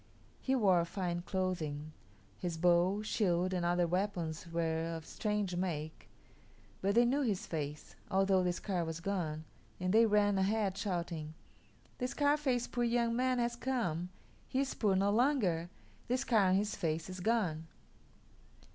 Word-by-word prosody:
He 265 - 0
wore 190 -8 +4
fine 175 -1 -3
clothing; 165 -6 -3 0.4
his 170 - -4
bow, 180 +4 +3
shield, 185 -4 +1
and 180 -1 -1
other 175 0 +2
weapons 170 -3 -2
were 165 0 -1
of 160 -1 -7
strange 210 -4 -2
make; 160 -4 -4 0.7
but 200 +2 +1
they 240 +1 +6
knew 270 +4 +2
his 215 -8 -1
face, 150 -2 -5 0.2
although 195 0 +3
the 180 -1 +1
scar 180 0 -2
was 165 0 -4
gone, 165 -4 -2 0.4
and 185 +1 0
they 225 +1 +6
ran 205 -2 +3
ahead, 200 0 +1
shouting, 170 -6 -3 0.6
"The 250 - 0
Scarface 285 -3 +1
poor 240 - -2
young 235 0 +1
man 255 +1 +1
has 240 0 0
come. 230 -10 -2 0.4
He 265 - 0
is 275 - -2
poor 205 -4 +1
no 200 +2 +3
longer. 210 - +2 0.4
The 250 - +1
scar 230 -6 +3
on 185 - +4
his 205 +2 0
face 160 -3 -2
is 185 0 -7
gone." 180 -7 0
185 Hz, 155 wpm, -34 LUFS, 170-225 Hz, 0.7 s, they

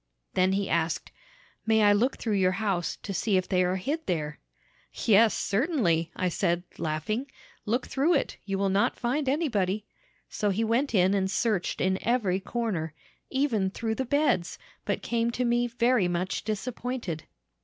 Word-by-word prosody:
"Then 185 +1 +3
he 200 0 0
asked, 165 0 -1 0.6
'May 220 -1 +4
I 205 0 +6
look 240 +6 +1
through 220 - -2
your 185 -2 +3
house, 195 -3 -1
to 200 - -4
see 200 0 +1
if 185 - -1
they 185 -1 +2
are 180 +1 +1
hid 290 - -3
there?' 150 -4 -2 0.5
"'Yes, 220 0 +4
certainly,' 200 - +1
I 185 - 0
said, 175 0 0 0.2
laughing; 215 - -2 0.4
'look 240 +4 0
through 305 +6 +2
it; 280 - -1
you 195 -1 -2
will 195 0 +1
not 195 +2 +2
find 260 +3 0
anybody.' 215 - 0 0.4
So 210 - -1
he 205 +3 0
went 235 +3 +1
in 185 0 +4
and 190 -1 +1
searched 205 -2 0
in 190 0 +1
every 215 -6 +1
corner, 190 -8 -3 0.3
even 245 -8 +1
through 220 +3 -2
the 265 - -2
beds, 285 - +1 0.3
but - - -2
came 235 0 0
to 245 +1 -1
me 240 0 +2
very 235 -3 +2
much 175 +1 -2
disappointed. 220 -5 -4
205 Hz, 165 wpm, -28 LUFS, 185-240 Hz, 0.6 s, I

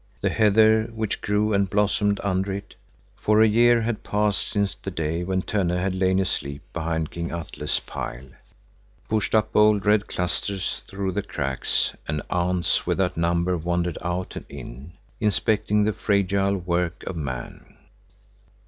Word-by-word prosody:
The - - +1
heather, 110 +1 +5
which 110 -2 -3
grew 105 +1 +1
and 100 -1 +2
blossomed 105 0 +2
under 95 0 0
it,—for 100 +2 -3
at 110 - +4
year 120 +1 +5
had 115 -1 -2
passed 105 0 0
since 100 -2 0
the 95 0 -7
day 80 -1 -2
when 95 +1 -1
Tönne 90 -4 0
had 95 +1 0
lain 95 0 +2
aleep 70 -7 -2
behind 80 -1 -2
King 85 0 -4
Atle's 85 -1 -3
pile,— 65 +2 -7 0.8
pushed 110 0 0
up 110 0 +2
bold 105 -1 +4
red 105 0 +3
clusters 90 +2 -2
through 95 -1 -3
the 100 - -1
cracks, 70 -9 -1
and 75 0 -2
ants 90 0 +1
without 95 -2 +1
number 85 +2 +1
wandered 85 0 -1
out 90 +1 -3
and - - -6
in, 70 +3 -9 0.3
inspecting 105 0 +2
the 105 +1 +1
fragile 100 -1 +1
work 85 -1 -1
of 95 - -4
man. 65 -6 -6
95 Hz, 150 wpm, -24 LUFS, 85-105 Hz, 0.8 s, heather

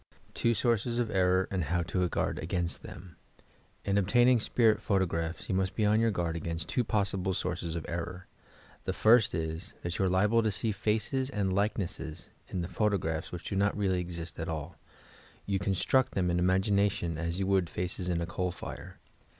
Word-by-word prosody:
TWO 115 0 +2
SOURCES 115 +1 +1
OF 120 -2 0
ERKOR, 95 -1 +3
Am> 95 - 0
HOW 85 +2 0
TO 90 +2 -1
OUARD 90 - 0
A0AIN8T 85 0 -2
TBEU 85 +1 -10 0.7
In 100 0 +1
obtaining 120 +5 +4
spirit 110 -1 +3
photographs 85 -5 -1
you - - -1
must 95 0 0
be 110 - +1
on 105 +1 +4
your 115 0 +3
guard 85 -5 -1
against 85 0 -4
two 125 - +1
possible 95 -3 0
sources 90 -3 -3
of 85 - -4
error. 90 +2 -4 0.6
The - - -1
first 110 -2 +5
is, 80 +2 -4
that 85 0 -3
you 95 - +3
are - - +2
liable 105 +5 +3
to 110 -1 +1
see 100 +3 -1
faces 110 +6 0
and 100 -7 -1
likenesses 95 -5 -2 0.2
in 90 - -3
the 85 - -3
photograph 90 -6 -1
which 90 0 -6
do - - -4
not 100 +1 +2
really 95 -3 +1
exist 85 -2 -5
at 80 - -3
all 80 +1 -4 0.4
— - - -25
you 100 -1 0
con 95 +1 0
struct 130 +8 +3
them 90 -2 +1
in 85 - +1
imagination 95 -2 +1
as 85 +2 -2
you 95 - 0
would 95 -3 +2
faces 90 +1 -3
in 85 -1 0
a - - -1
coal 90 +1 -2
fire. - - -8
95 Hz, 195 wpm, -30 LUFS, 85-105 Hz, 0.7 s, first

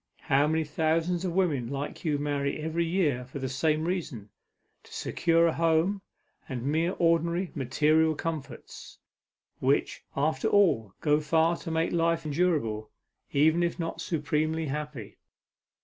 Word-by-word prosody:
How 140 +2 +2
many 160 +1 +1
thousands 165 +4 0
of 175 - -2
women 160 -10 +1
like 140 +1 -5
you 155 -4 +1
marry 140 -1 -1
every 160 +2 -1
year 160 -8 +1
for 130 +3 -9
the 135 -1 -3
same 155 +4 0
reason, 150 - -4 0.5
to - - -20
secure 165 0 +1
a 165 - +2
home, 165 +4 +1 0.5
and 125 -3 -4
mere 160 +5 +1
ordinary, 170 +1 +1
material 155 +4 +2
comforts, 150 -5 -6 0.6
which - - 0
after 140 -1 +1
all 115 - +3
go 150 -1 +3
far 160 +2 +2
to - - -7
make 160 0 0
life 165 -1 +1
endurable, 145 -10 0 0.4
even 160 +4 +3
if 170 0 0
not 165 -1 -4
supremely 155 0 -1
happy." 150 -6 -5
160 Hz, 140 wpm, -28 LUFS, 140-165 Hz, 0.6 s, all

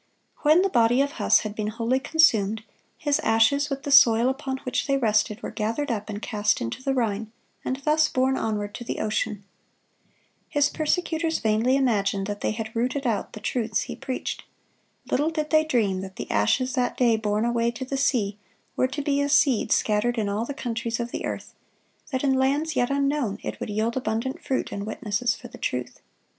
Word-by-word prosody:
(144) 295 - +1
When 335 +4 +6
the 390 - -1 0.2
body 245 +3 +3
of 285 - -5
Huss - - +4
had 215 -1 -5
been 215 0 -3
wholly 230 +4 0
consumed, 220 -9 +3 0.3
his 290 -1 +1
ashes, 225 +6 +3
with 275 0 -4
the 285 - -3
soil 240 -3 +7
upon 265 0 -3
which 255 - -1
they 275 -1 +2
rested, 215 -2 +1
were - - -4
gathered 230 +6 -2
up 215 -2 -3
and 205 -1 -4
cast 210 -2 0
into 115 - -4
the 270 0 -1
Rhine, 220 -3 -1 0.3
and 260 - -1
thus 310 +1 +3
borne 260 +1 +1
onward 210 -4 -2
to - - -7
the 240 - -4
ocean. 215 -1 -2 1.1
His 290 -1 +2
persecutors 320 0 0
vainly 220 +4 +2
imagined 200 -7 +1
that 205 0 -5
they - - 0
had 220 0 -5
rooted 255 +4 -1
out 225 -4 -1
the - - -7
truths 220 0 -1
he - - -6
preached. 260 -2 -4 0.7
Little 295 +4 +2
did 310 -2 -3
they 310 0 +5
dream 210 -10 +1
that 190 0 -8
the - - -6
ashes 255 - +2
that 250 -2 0
day 240 -3 +4
borne 215 0 0
away 235 0 +1
to 240 +2 -5
the 275 - -3
sea 220 -7 0 0.4
were 255 - +2
to 290 +2 -4
be 285 0 +1
as 285 0 +1
seed 255 -6 +3
scattered 225 +3 +2
in 215 -2 0
all 205 +3 -1
the 285 - -6
countries 230 -2 -3
of 235 0 -3
the - - -4
earth; - - -5 0.6
that 260 -2 -2
in 270 -2 +3
lands 280 +4 +1
yet 245 -1 +2
unknown 275 -6 0
it - - -5
would - - -5
yield 220 +3 -1
abundant 250 +1 -2
fruit 265 - -2
in 200 - -4
witnesses 220 +2 -1
for 245 - -11
the 245 - -13
truth. 125 -1 -3
240 Hz, 200 wpm, -25 LUFS, 215-275 Hz, 1.1 s, soil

